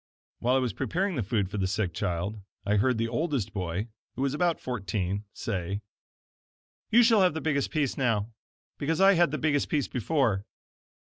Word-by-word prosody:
While 125 Hz, +2 st, +2 dB
I -, -, +5 dB
was 125 Hz, -5 st, 0 dB
preparing 185 Hz, -, -1 dB
the 120 Hz, -, 0 dB
food 100 Hz, -1 st, 0 dB
for 105 Hz, -, -3 dB
the 95 Hz, -, +1 dB
sick 95 Hz, -2 st, -1 dB
child, 90 Hz, +5 st, -2 dB, 0.2 s
I 105 Hz, +1 st, +2 dB
heard 125 Hz, +3 st, +2 dB
the 115 Hz, 0 st, 0 dB
oldest 125 Hz, -, -1 dB
boy 95 Hz, +2 st, -3 dB, 0.3 s
(who 130 Hz, -, -1 dB
was 140 Hz, -1 st, +1 dB
about 170 Hz, +2 st, +1 dB
fourteen), 100 Hz, -4 st, -2 dB
say: 100 Hz, -1 st, -3 dB, 1.1 s
"You 240 Hz, +2 st, +6 dB
shall 225 Hz, -3 st, +5 dB
have 180 Hz, -4 st, +3 dB
the -, -, -1 dB
biggest 145 Hz, -3 st, 0 dB
piece 145 Hz, -5 st, 0 dB
now, 115 Hz, -4 st, +1 dB, 0.5 s
because 160 Hz, +4 st, 0 dB
I 195 Hz, +1 st, +7 dB
had 175 Hz, -3 st, +4 dB
the 155 Hz, -, -2 dB
biggest 145 Hz, -2 st, +1 dB
piece 145 Hz, -3 st, +1 dB
before." 125 Hz, -6 st, +1 dB
120 Hz, 180 wpm, -28 LUFS, 100-155 Hz, 1.1 s, I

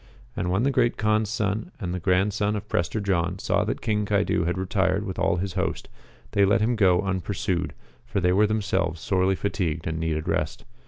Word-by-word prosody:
And 90 Hz, -, -1 dB
when 95 Hz, +5 st, +1 dB
the 140 Hz, -, +3 dB
Great 120 Hz, -2 st, +2 dB
Kaan's 110 Hz, -1 st, +1 dB
son 110 Hz, -, -1 dB
and 90 Hz, -5 st, -3 dB
the 90 Hz, -, -2 dB
grandson 100 Hz, +4 st, +1 dB
of 105 Hz, 0 st, -5 dB
Prester 95 Hz, +2 st, -1 dB
John 90 Hz, -3 st, 0 dB
saw -, -, +1 dB
that -, -, -3 dB
King 105 Hz, -2 st, 0 dB
Caidu 100 Hz, -4 st, +1 dB
had 85 Hz, +2 st, -1 dB
retired 95 Hz, +1 st, 0 dB
with 95 Hz, -2 st, -5 dB
all -, -, +2 dB
his 95 Hz, +1 st, -3 dB
host, -, -, -2 dB, 0.4 s
they 100 Hz, -, +3 dB
let 105 Hz, +4 st, +4 dB
them 115 Hz, +3 st, +1 dB
go 95 Hz, -5 st, +4 dB
unpursued, 95 Hz, -1 st, -2 dB, 0.3 s
for -, -, -2 dB
they 90 Hz, -1 st, +2 dB
were 105 Hz, +3 st, +4 dB
themselves 100 Hz, -6 st, 0 dB
sorely 95 Hz, +1 st, +1 dB
fatigued 85 Hz, -6 st, -2 dB
and 80 Hz, 0 st, -2 dB
needed 80 Hz, -1 st, -2 dB
rest. -, -, -2 dB
95 Hz, 200 wpm, -25 LUFS, 90-105 Hz, 0.4 s, let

